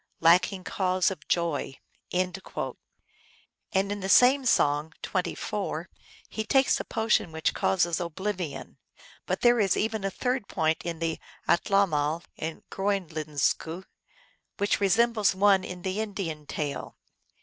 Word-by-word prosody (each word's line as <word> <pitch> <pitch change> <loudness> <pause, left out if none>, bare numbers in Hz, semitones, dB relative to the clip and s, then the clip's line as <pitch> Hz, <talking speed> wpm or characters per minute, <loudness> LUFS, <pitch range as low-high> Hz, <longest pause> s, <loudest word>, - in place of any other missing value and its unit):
Lacking 180 +3 +4
cause 185 -1 +1
of 190 - -9
joy; 170 -5 0 0.2
" - - -41
and 180 0 0
in 190 +1 -6
the 205 - -2
very 195 -1 -5
same 260 +5 +6
song 150 -5 +2
(24) - - -3 0.4
he 220 - -4
takes 265 +4 +3
a - - -3
potion 220 -6 +1
which 160 0 0
causes 175 -3 +1
oblivion. 180 -1 -4 0.5
But - - -1
there 240 -1 +5
is 195 -3 +2
even 220 -1 -1
a 195 - 0
third 250 +1 -2
point 160 -2 0
in 170 -1 -4
the 165 0 -2 0.3
Atlamal 170 -4 +2
in 160 0 -5
Groenlenzku, 165 -3 -1 0.7
which 205 0 +1
resem 225 +4 +3
bles 210 -4 +2
one 195 -1 +4
in 180 -1 -7
the 190 +2 -2
Indian 175 -8 -4
tale. 145 -2 -4
185 Hz, 135 wpm, -27 LUFS, 165-205 Hz, 0.7 s, same